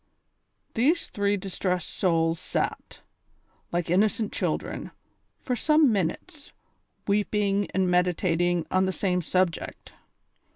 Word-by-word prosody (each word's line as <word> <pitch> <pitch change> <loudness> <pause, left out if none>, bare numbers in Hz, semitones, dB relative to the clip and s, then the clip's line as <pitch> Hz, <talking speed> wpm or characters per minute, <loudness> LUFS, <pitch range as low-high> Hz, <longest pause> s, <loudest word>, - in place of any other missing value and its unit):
These 300 +9 +1
three 205 0 +1
distressed 185 -2 -2
souls 165 -2 +1
sat, - - -3 0.7
like 170 -1 -1
innocent 210 +3 +2
children, - - -2 0.5
for 250 - -2
some 300 +2 +4
minutes, 220 - -3 0.6
weeping 205 -1 +1
and 190 0 +1
meditating 175 -1 +1
on 185 0 +2
the - - +1
same 180 -2 0
subject. 180 0 -1
190 Hz, 100 wpm, -26 LUFS, 175-210 Hz, 0.7 s, some